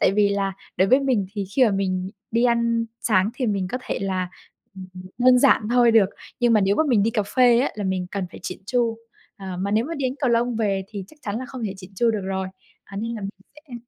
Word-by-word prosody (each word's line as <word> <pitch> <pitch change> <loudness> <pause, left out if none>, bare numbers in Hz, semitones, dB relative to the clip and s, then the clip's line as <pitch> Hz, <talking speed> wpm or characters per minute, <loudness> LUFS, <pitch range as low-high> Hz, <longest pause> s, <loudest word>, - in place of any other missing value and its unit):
tại 190 - +4
vì 205 0 +3
là 200 -1 -1 0.2
đối 190 - +3
với 260 +5 +5
mình 250 -8 +1
thì 205 -2 -3
khi 260 - +6
mà 225 - +3
mình 190 -1 -1 0.2
đi 230 +2 +2
ăn 235 -1 +2
sáng 205 -1 +2
thì 250 -1 -2
mình 195 -4 -1
có 255 - -1
thể - - -3
là, 185 -2 -1 0.5
ừm, 190 -1 -9
ừm, 185 - -9 0.2
đơn 250 0 +6
giản 260 -3 +5
thôi 240 -1 +5
được, 220 -4 +5 0.3
nhưng 240 -1 +4
mà 215 - +5
nếu 195 +1 +2
mà - - +4
mình 230 -6 +4
đi 225 - +2
cà 215 - 0
phê 245 -1 +6
á 275 - +1
là 210 - -4
mình 185 -1 -1
cần 195 -2 -3
phải - - -11
chỉn 185 - -5
chu. 230 -1 0 0.4
À, 190 -2 -6
mà 200 - -1
nếu 215 +3 +2
mà 330 +5 -4
đi 285 - -4
đánh 255 - -5
cầu 260 -5 +2
lông 235 0 +1
về 200 -3 0
thì 200 -3 -6
chắc 310 - -18
chắn 205 +1 -3
là 255 - -6
không 255 -3 -6
thể 195 -2 -3
chỉn 190 0 -12
chu 230 +4 +2
được 215 -3 -2
rồi. 190 0 -2 0.4
À, 195 - -11
nên 230 +3 -3
là 220 - -6
mình 195 0 -4 0.2
sẽ 300 -5 -13
215 Hz, 275 wpm, -23 LUFS, 195-240 Hz, 0.5 s, khi